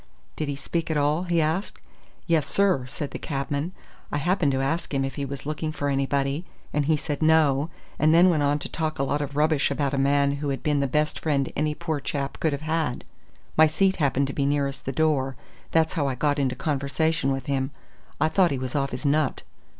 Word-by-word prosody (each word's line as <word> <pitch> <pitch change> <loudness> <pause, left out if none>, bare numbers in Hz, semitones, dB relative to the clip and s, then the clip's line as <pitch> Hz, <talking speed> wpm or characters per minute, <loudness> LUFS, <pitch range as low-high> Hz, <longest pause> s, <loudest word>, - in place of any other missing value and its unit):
"Did 155 - -3
he 145 - -2
speak 165 +4 -3
at 160 - +1
all?" 150 +5 +1
he 170 -1 +1
asked. 160 +6 -1 0.5
"Yes, 160 -4 +2
sir," 190 -11 +2
said 140 +2 -5
the - - -6
cabman. 145 +3 -2 0.4
"I - - 0
happened 165 -1 +2
to 130 - 0
ask 160 +6 -1
him 135 -1 0
if 135 - -4
he 140 - -3
was 140 0 -6
looking 155 +1 -2
for 145 -2 -2
anybody, 140 +2 0 0.3
and 150 -1 +1
he 155 +1 +3
said 145 0 -4
no, 155 -2 +4 0.3
and 155 +1 +4
then 175 +3 +6
went 155 -3 +1
on 145 0 +2
to - - -4
talk 155 -1 -3
a 135 - 0
lot 145 +2 0
of 145 -1 -4
rubbish 150 -1 +2
about 140 -1 -1
a 140 - +1
man 140 +1 +2
who 145 0 -3
had 135 - -3
been 150 -3 +2
the 140 - +1
best 150 +3 0
friend 140 -4 0
any 150 +1 0
poor 160 -3 -2
chap 140 0 -3
could 160 - +1
have 140 +1 -4
had. 155 -5 -1 0.5
My 160 0 +7
seat 190 +5 +2
happened 140 -2 +2
to 135 - -4
be 140 -1 0
nearest 140 -1 -1
the 135 - -1
door, 135 -2 +1 0.3
that's 160 -1 +2
how 145 -5 0
I 135 - -1
got 145 +3 +1
into 130 -2 0
conversation 145 0 0
with 135 0 -3
him. 135 -1 0 0.5
I - - +3
thought 180 +2 +3
he 140 - -1
was 130 -1 -4
off 140 -1 0
his - - -6
nut." 145 0 +1
145 Hz, 225 wpm, -25 LUFS, 140-155 Hz, 0.5 s, My